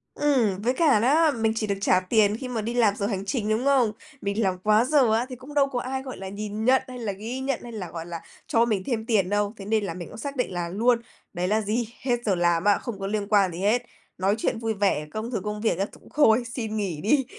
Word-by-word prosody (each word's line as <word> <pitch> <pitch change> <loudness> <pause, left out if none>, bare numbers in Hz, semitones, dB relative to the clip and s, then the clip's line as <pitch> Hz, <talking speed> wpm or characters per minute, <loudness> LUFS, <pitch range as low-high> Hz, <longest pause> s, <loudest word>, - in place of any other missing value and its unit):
Ừm, 235 -10 +2
với 245 +3 +1
cả 295 -8 +4
đó, 300 +6 +4
mình 220 -3 0
chỉ 215 -1 -1
được 200 - 0
trả 185 -2 +4
tiền 210 +2 +2
khi 255 - -6
mà 235 -3 -2
đi 230 +3 -3
làm 220 -4 +3
giờ 200 - -2
hành 195 -2 -3
trình, 215 0 -1
đúng 225 +5 0
không? 260 -6 +4 0.3
Mình 200 +3 -1
làm 185 -1 +1
quá 215 +3 +4
giờ 260 -6 +4
á 235 +3 +2
thì 255 - -6
cũng 260 +4 -12
đâu 280 -1 +4
có 250 -2 -2
ai, 265 +1 -3
gọi 260 - -7
là, 190 0 -6
nhìn 210 +2 -4
nhận 260 +1 +5
hay 250 -1 -8
là 215 -3 -2
ghi 225 +7 -5
nhận 265 -1 -1
hay 240 - -8
là, 190 -6 -6
gọi 165 -1 -6
là, 170 -1 -6 0.3
cho 230 0 +3
mình 205 -5 0
thêm 225 -4 -2
tiền 200 -6 +2
đâu. 205 +1 0
Thế 195 - -8
nên 215 0 +1
là 170 - -3
mình 175 -1 -7
cũng 220 - -11
xác 280 +4 -5
định 250 -6 -1
là 175 -1 -3
luôn, 235 +5 +2 0.3
đấy 180 +1 -1
là 215 +2 +2
gì? 220 +2 -1
Hết 245 -2 0
giờ 195 -3 +2
làm 175 0 +2
á, 205 -1 +4
không 230 -6 -6
có 195 - -3
liên 205 -1 -2
quan 200 -4 +3
gì 170 - -7
hết. 225 +5 +2 0.3
Nói 195 +3 +2
chuyện 225 - -1
vui 225 -1 -1
vẻ, 195 -7 +1
công 220 +3 -4
thực 215 -5 -2
công 210 0 -4
việc 220 -6 +1
á 195 - +2
th - - -14 0.2
thôi, 245 -6 +4
xin 220 -3 -3
nghỉ 180 -7 -2
đi. 270 +5 +2
220 Hz, 280 wpm, -25 LUFS, 200-245 Hz, 0.3 s, nhận